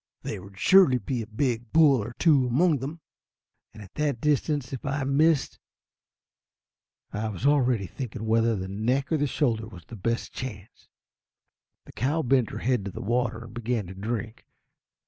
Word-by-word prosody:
There -, -, -5 dB
would 100 Hz, +1 st, -14 dB
surely 180 Hz, -, +6 dB
be 120 Hz, +2 st, -3 dB
a 110 Hz, -, -7 dB
big 120 Hz, 0 st, -2 dB
bull 145 Hz, -6 st, +5 dB
or 120 Hz, -, -7 dB
two 140 Hz, -6 st, +4 dB
among 150 Hz, +4 st, +3 dB
them, 150 Hz, +6 st, -6 dB, 0.7 s
and 110 Hz, -, -11 dB
at 95 Hz, -, -15 dB
that 145 Hz, -5 st, -1 dB
distance 145 Hz, -1 st, 0 dB
if 130 Hz, -, -5 dB
I 140 Hz, 0 st, -1 dB
missed. 145 Hz, +2 st, +2 dB, 1.5 s
I 110 Hz, +2 st, -2 dB
was 105 Hz, +4 st, -5 dB
already 130 Hz, -7 st, +3 dB
thinking 120 Hz, +1 st, -6 dB
whether 115 Hz, +1 st, +2 dB
the 95 Hz, -1 st, -4 dB
neck 120 Hz, -, -1 dB
or 160 Hz, -, +3 dB
the 145 Hz, 0 st, +1 dB
shoulder 115 Hz, -6 st, 0 dB
was 90 Hz, -7 st, -12 dB
the 120 Hz, -, -10 dB
best 115 Hz, +4 st, -2 dB
chance. 105 Hz, -6 st, -8 dB, 1.0 s
The -, -, -13 dB
cow 145 Hz, +8 st, -1 dB
bent 130 Hz, -2 st, +2 dB
her -, -, -6 dB
head 125 Hz, -4 st, 0 dB
to 100 Hz, -, -4 dB
the -, -, -8 dB
water, 120 Hz, +1 st, -1 dB
and 115 Hz, -, -12 dB
began 120 Hz, -2 st, -2 dB
to 90 Hz, -, -8 dB
drink. 110 Hz, +3 st, -5 dB
120 Hz, 175 wpm, -26 LUFS, 110-140 Hz, 1.5 s, surely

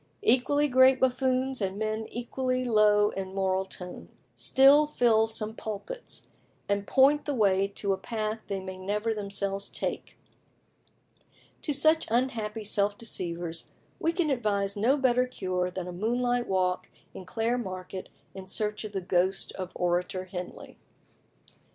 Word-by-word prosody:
Equally 290 Hz, -, +3 dB
great 260 Hz, 0 st, +5 dB
buffoons, 260 Hz, 0 st, +1 dB
and 195 Hz, 0 st, -2 dB
men 220 Hz, +1 st, -2 dB
equally 255 Hz, +1 st, -2 dB
low 210 Hz, -2 st, +4 dB
in 190 Hz, 0 st, -5 dB
moral 190 Hz, 0 st, +1 dB
tone, 180 Hz, -1 st, -9 dB, 0.3 s
still 280 Hz, +3 st, +6 dB
fill 225 Hz, -6 st, +3 dB
some 220 Hz, -1 st, -1 dB
pulpits, 225 Hz, -, -7 dB, 0.4 s
and 200 Hz, 0 st, -1 dB
point 280 Hz, +2 st, +4 dB
the 290 Hz, -, -1 dB
way 195 Hz, -3 st, +3 dB
to 200 Hz, 0 st, -2 dB
a -, -, -2 dB
path 215 Hz, +1 st, -3 dB
they 195 Hz, -1 st, -2 dB
may 185 Hz, 0 st, -7 dB
never 210 Hz, +4 st, -1 dB
themselves 200 Hz, -1 st, -3 dB
take. -, -, -4 dB, 1.4 s
To 300 Hz, -, -1 dB
such 315 Hz, +3 st, +3 dB
unhappy 225 Hz, -3 st, -1 dB
self 205 Hz, 0 st, +1 dB
deceivers 170 Hz, -6 st, -3 dB, 0.3 s
we 330 Hz, -, +1 dB
can 335 Hz, -3 st, 0 dB
advise 200 Hz, -5 st, 0 dB
no 235 Hz, +8 st, +3 dB
better 250 Hz, -2 st, +2 dB
cure 185 Hz, -7 st, -2 dB
than 180 Hz, 0 st, -5 dB
a -, -, -5 dB
moonlight 245 Hz, +5 st, 0 dB
walk 185 Hz, -1 st, 0 dB, 0.2 s
in -, -, -8 dB
Clare 225 Hz, +6 st, -1 dB
Market 185 Hz, -3 st, -6 dB, 0.2 s
in 190 Hz, -1 st, -9 dB
search 210 Hz, +2 st, -2 dB
of 210 Hz, -1 st, -7 dB
the 195 Hz, -, -2 dB
ghost 185 Hz, +2 st, 0 dB
of 185 Hz, -1 st, -6 dB
Orator 180 Hz, +1 st, -1 dB
Henley. 180 Hz, -1 st, -8 dB
210 Hz, 145 wpm, -28 LUFS, 190-250 Hz, 1.4 s, still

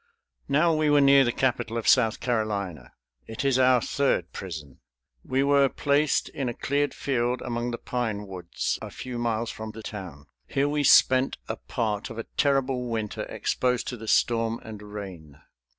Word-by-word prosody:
Now 160 Hz, +4 st, +3 dB
we 155 Hz, -1 st, +2 dB
were 145 Hz, 0 st, +5 dB
near 140 Hz, -1 st, +6 dB
the 120 Hz, -, +1 dB
capital 120 Hz, -3 st, -1 dB
of 115 Hz, -, -3 dB
South 115 Hz, -4 st, +4 dB
Carolina. 105 Hz, -, -2 dB, 0.3 s
It 110 Hz, +5 st, -5 dB
is 135 Hz, -2 st, +3 dB
our 130 Hz, -1 st, +5 dB
third 135 Hz, -12 st, 0 dB
prison. 80 Hz, -8 st, -8 dB, 0.4 s
We 135 Hz, +1 st, 0 dB
were 140 Hz, -1 st, +4 dB
placed 145 Hz, +2 st, +1 dB
in 135 Hz, -3 st, -3 dB
a 120 Hz, -, -5 dB
cleared 145 Hz, 0 st, -1 dB
field 125 Hz, -2 st, 0 dB
among 120 Hz, 0 st, -2 dB
the 120 Hz, -, -3 dB
pine 110 Hz, -5 st, -3 dB
woods, 90 Hz, -3 st, -3 dB
a -, -, -6 dB
few 125 Hz, -2 st, -6 dB
miles 115 Hz, -1 st, -1 dB
from 110 Hz, 0 st, -7 dB
the 110 Hz, -, -9 dB
town. 90 Hz, -10 st, -8 dB, 0.2 s
Here 140 Hz, +1 st, +1 dB
we 145 Hz, 0 st, 0 dB
spent 130 Hz, -1 st, +5 dB
a -, -, -2 dB
part 110 Hz, -4 st, -3 dB
of 115 Hz, -, -8 dB
a 115 Hz, -, -3 dB
terrible 135 Hz, -3 st, +1 dB
winter 110 Hz, -2 st, -3 dB
exposed 125 Hz, -1 st, -1 dB
to 125 Hz, -, -4 dB
the 110 Hz, 0 st, -9 dB
storm 115 Hz, 0 st, +2 dB
and 110 Hz, -2 st, -9 dB
rain. 95 Hz, -8 st, -9 dB
120 Hz, 175 wpm, -26 LUFS, 110-135 Hz, 0.4 s, near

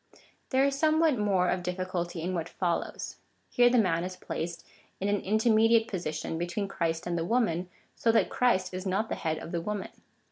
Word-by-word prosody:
There 265 Hz, 0 st, +3 dB
is 275 Hz, 0 st, 0 dB
somewhat 315 Hz, -4 st, +3 dB
more 195 Hz, -3 st, +2 dB
of 180 Hz, -, 0 dB
difficulty 180 Hz, -2 st, -3 dB
in 185 Hz, +2 st, -2 dB
what 165 Hz, -2 st, -3 dB
follows. 175 Hz, -2 st, -2 dB, 0.3 s
Here 245 Hz, 0 st, +5 dB
the 245 Hz, -, +3 dB
man 180 Hz, -6 st, +2 dB
is 185 Hz, 0 st, -5 dB
placed 170 Hz, -1 st, -5 dB, 0.3 s
in 195 Hz, -, -1 dB
an 205 Hz, -1 st, +1 dB
intermediate 225 Hz, +2 st, +4 dB
position 160 Hz, -3 st, -3 dB
between 175 Hz, +4 st, -2 dB
Christ 165 Hz, -3 st, -2 dB
and 175 Hz, -1 st, -1 dB
the -, -, -1 dB
woman, 180 Hz, -4 st, 0 dB, 0.3 s
so 230 Hz, -, +2 dB
that 225 Hz, -, +3 dB
Christ 185 Hz, -7 st, +2 dB
is 185 Hz, +1 st, -4 dB
not 200 Hz, +4 st, 0 dB
the -, -, -1 dB
head 160 Hz, -2 st, -2 dB
of 165 Hz, -, -8 dB
the 170 Hz, -, -1 dB
woman. 205 Hz, +2 st, -3 dB
185 Hz, 190 wpm, -29 LUFS, 175-225 Hz, 0.3 s, Here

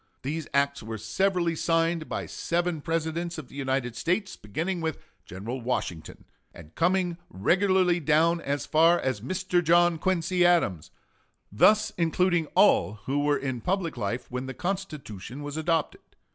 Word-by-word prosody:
These 155 Hz, +3 st, -3 dB
acts 140 Hz, 0 st, +1 dB
were 110 Hz, 0 st, -6 dB
severally 170 Hz, -, 0 dB
signed 165 Hz, 0 st, 0 dB
by -, -, -3 dB
seven 170 Hz, -2 st, -2 dB
Presidents 165 Hz, +1 st, -2 dB
of 150 Hz, -5 st, -8 dB
the -, -, -14 dB
United 130 Hz, -3 st, -2 dB
States, 185 Hz, -, -1 dB
beginning 165 Hz, -, -3 dB
with 160 Hz, -2 st, -2 dB, 0.3 s
General 110 Hz, +8 st, -6 dB
Washington, 115 Hz, -9 st, -4 dB, 0.3 s
and 80 Hz, -1 st, -13 dB
coming 175 Hz, 0 st, +1 dB
regularly 180 Hz, -, +2 dB
down 165 Hz, +2 st, +2 dB
as 140 Hz, -1 st, -2 dB
far 165 Hz, +2 st, +4 dB
as 130 Hz, -6 st, -2 dB
Mr. 180 Hz, -, 0 dB
John 170 Hz, 0 st, +4 dB
Quincy 180 Hz, 0 st, +1 dB
Adams, 165 Hz, -, +2 dB, 0.6 s
thus 215 Hz, -, +4 dB
including 170 Hz, 0 st, +2 dB
all 90 Hz, +5 st, +4 dB
who 140 Hz, +2 st, 0 dB
were 145 Hz, 0 st, +2 dB
in 130 Hz, -3 st, -4 dB
public 180 Hz, -, -1 dB
life 120 Hz, +2 st, -3 dB
when 125 Hz, +1 st, -4 dB
the 130 Hz, -, -6 dB
Constitution 150 Hz, -, -5 dB
was 145 Hz, 0 st, -6 dB
adopted. 160 Hz, 0 st, -1 dB
160 Hz, 145 wpm, -27 LUFS, 130-175 Hz, 0.6 s, far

